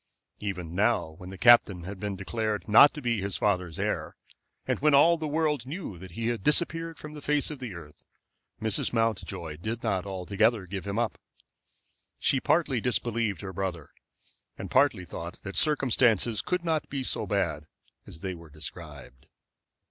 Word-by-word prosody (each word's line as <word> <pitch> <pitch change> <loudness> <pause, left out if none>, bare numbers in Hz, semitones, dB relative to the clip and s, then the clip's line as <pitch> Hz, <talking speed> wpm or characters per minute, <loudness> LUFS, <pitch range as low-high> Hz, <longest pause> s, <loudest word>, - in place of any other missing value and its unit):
Even 90 -5 -4
now, 105 -1 +2
when 90 - -9
the 95 - -8
captain 115 -7 +5
had 95 +2 -7
been 105 -1 -3
declared 105 -1 -3
not 115 +7 +8
to 150 - -9
be 115 -4 0
his 100 -1 -2
father's 90 -5 0
heir, - - -2 0.5
and - - 0
when 150 -1 +4
all 165 +5 +6
the 160 -2 -4
world 150 -4 0
knew 140 - -6
that 90 -1 -11
he 115 +4 -2
had 115 -5 -3
disappeared 165 +1 +2
from 150 0 -9
the 150 - -9
face 150 +1 +1
of 150 - -7
the 120 -8 -6
earth, 75 -3 -12 0.6
Mrs. 110 +1 +1
Mountjoy 95 -8 -1
did 110 +7 -5
not 95 0 -1
altogether 100 +3 +1
give 95 +1 -6
him 100 +1 -2
up. 115 -2 -1 1.0
She 135 - +2
partly 140 -5 +1
disbelieved 115 -6 -1
her 95 -1 -6
brother, 90 -6 -4 0.7
and - - -7
partly 90 - +3
thought 85 +1 -7
that 95 -1 -7
circumstances 120 -7 +2
could 180 -1 -2
not 160 -2 0
be 135 -1 -3
so - - 0
bad - - -1 0.4
as 80 - -11
they 95 -2 -3
were 85 -2 -12
described. 75 -4 -9
105 Hz, 170 wpm, -28 LUFS, 95-130 Hz, 1.0 s, not